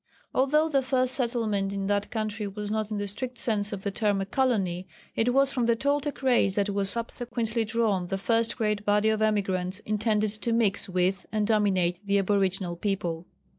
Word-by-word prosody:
Although 300 Hz, +4 st, +3 dB
the 275 Hz, -3 st, +2 dB
first 255 Hz, -1 st, +1 dB
settlement 225 Hz, -6 st, 0 dB
in 195 Hz, -1 st, -3 dB
that 205 Hz, 0 st, 0 dB
country 215 Hz, -2 st, -3 dB
was 205 Hz, +1 st, -5 dB
not 215 Hz, -1 st, -1 dB
in 215 Hz, -, -3 dB
the 205 Hz, 0 st, -2 dB
strict 245 Hz, +5 st, -6 dB
sense 210 Hz, -4 st, 0 dB
of 200 Hz, -2 st, -5 dB
the 200 Hz, -, -1 dB
term 205 Hz, -1 st, +1 dB
a 195 Hz, -, -1 dB
colony, 195 Hz, -6 st, 0 dB, 0.3 s
it 235 Hz, +2 st, +2 dB
was 275 Hz, +1 st, +3 dB
from 245 Hz, -3 st, 0 dB
the 235 Hz, -, +4 dB
Toltec 285 Hz, +3 st, -1 dB
race 240 Hz, -7 st, +3 dB
that 205 Hz, 0 st, +1 dB
was 200 Hz, -1 st, 0 dB
subsequently 230 Hz, 0 st, -1 dB
drawn 220 Hz, -5 st, 0 dB
the 195 Hz, -, -2 dB
first 230 Hz, +3 st, 0 dB
great 210 Hz, -3 st, 0 dB
body 210 Hz, +1 st, +3 dB
of 220 Hz, 0 st, 0 dB
emigrants 195 Hz, -3 st, 0 dB
intended 215 Hz, 0 st, +1 dB
to 220 Hz, +2 st, -2 dB
mix 220 Hz, -4 st, +2 dB
with 185 Hz, +1 st, 0 dB
and 215 Hz, -1 st, 0 dB
dominate 195 Hz, -4 st, +1 dB
the 200 Hz, 0 st, +1 dB
aboriginal 195 Hz, -2 st, +1 dB
people. 175 Hz, -3 st, -3 dB
210 Hz, 190 wpm, -27 LUFS, 195-230 Hz, 0.3 s, the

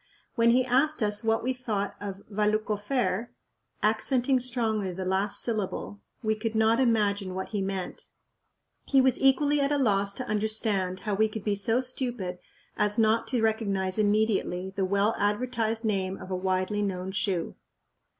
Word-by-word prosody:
When 230 Hz, -2 st, +3 dB
he 250 Hz, +2 st, +4 dB
asked 265 Hz, +2 st, +2 dB
us 210 Hz, +1 st, 0 dB
what 225 Hz, 0 st, +1 dB
we 260 Hz, +2 st, 0 dB
thought 220 Hz, -5 st, -3 dB
of 200 Hz, -1 st, -6 dB
"Valluck 215 Hz, +1 st, 0 dB
ofair'," 210 Hz, -1 st, -1 dB, 0.6 s
accenting 250 Hz, +4 st, +2 dB
strongly 225 Hz, -6 st, -1 dB
the 185 Hz, +1 st, -5 dB
last 195 Hz, +2 st, 0 dB
syllable, 210 Hz, -2 st, -3 dB, 0.2 s
we 220 Hz, 0 st, +2 dB
could 220 Hz, +1 st, -3 dB
not 220 Hz, +2 st, +3 dB
imagine 205 Hz, -6 st, +1 dB
what 190 Hz, -, -4 dB
he 205 Hz, -2 st, -2 dB
meant. 190 Hz, -1 st, -4 dB, 0.8 s
He 275 Hz, -, +4 dB
was 260 Hz, -1 st, +3 dB
equally 285 Hz, +2 st, +4 dB
at 280 Hz, +1 st, +1 dB
a 290 Hz, -, +2 dB
loss 200 Hz, -6 st, +2 dB
to 255 Hz, -, -4 dB
understand 210 Hz, -3 st, 0 dB
how 210 Hz, -, -2 dB
we 215 Hz, +2 st, +3 dB
could 215 Hz, -1 st, -6 dB
be 210 Hz, -, +1 dB
so 225 Hz, +5 st, +1 dB
stupid 245 Hz, -8 st, -4 dB, 0.4 s
as 210 Hz, 0 st, 0 dB
not 225 Hz, 0 st, +3 dB
to 245 Hz, -4 st, 0 dB
recognize 200 Hz, -3 st, 0 dB
immediately 205 Hz, -3 st, +1 dB
the 195 Hz, -2 st, +1 dB
well 200 Hz, +3 st, +2 dB
advertised 225 Hz, +1 st, 0 dB
name 195 Hz, -3 st, -1 dB
of 185 Hz, -, -9 dB
a -, -, 0 dB
widely 185 Hz, +2 st, 0 dB
known 190 Hz, -2 st, -2 dB
shoe. 190 Hz, -3 st, -1 dB
215 Hz, 165 wpm, -28 LUFS, 195-235 Hz, 0.8 s, he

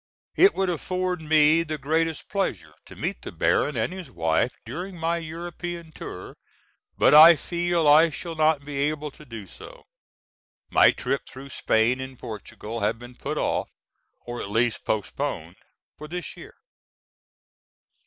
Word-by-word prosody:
It 390 Hz, -, +6 dB
would 190 Hz, -2 st, +1 dB
afford 180 Hz, +1 st, -2 dB
me 155 Hz, +1 st, +4 dB
the 155 Hz, -2 st, -4 dB
greatest 160 Hz, +3 st, -1 dB
pleasure 105 Hz, -, -2 dB
to -, -, -12 dB
meet -, -, -4 dB
the -, -, -7 dB
Baron 145 Hz, -4 st, +1 dB
and 110 Hz, +10 st, -1 dB
his 185 Hz, -2 st, -8 dB
wife 80 Hz, +7 st, 0 dB
during 175 Hz, +10 st, -6 dB
my 165 Hz, +1 st, 0 dB
European 170 Hz, +1 st, -6 dB
tour, 90 Hz, -10 st, -9 dB, 0.6 s
but -, -, +5 dB
I 160 Hz, +3 st, +10 dB
fear 175 Hz, +3 st, -2 dB
I 155 Hz, +1 st, +6 dB
shall 165 Hz, +2 st, -6 dB
not 155 Hz, -2 st, +2 dB
be 145 Hz, -1 st, -5 dB
able 150 Hz, +1 st, -1 dB
to 150 Hz, -, -15 dB
do 115 Hz, -6 st, -8 dB
so. -, -, -13 dB, 0.9 s
My -, -, +7 dB
trip 135 Hz, -, -2 dB
through 135 Hz, +1 st, -10 dB
Spain 120 Hz, +1 st, +1 dB
and 130 Hz, -1 st, -8 dB
Portugal 110 Hz, +1 st, -7 dB
has 105 Hz, 0 st, +1 dB
been 120 Hz, +2 st, -12 dB
put -, -, -5 dB
off, -, -, -1 dB, 0.6 s
or 120 Hz, 0 st, -5 dB
at -, -, -6 dB
least 115 Hz, +2 st, 0 dB
postponed, 100 Hz, -, -3 dB, 0.4 s
for 150 Hz, -, -8 dB
this 175 Hz, +2 st, -6 dB
year. -, -, -12 dB
150 Hz, 155 wpm, -25 LUFS, 120-170 Hz, 0.9 s, I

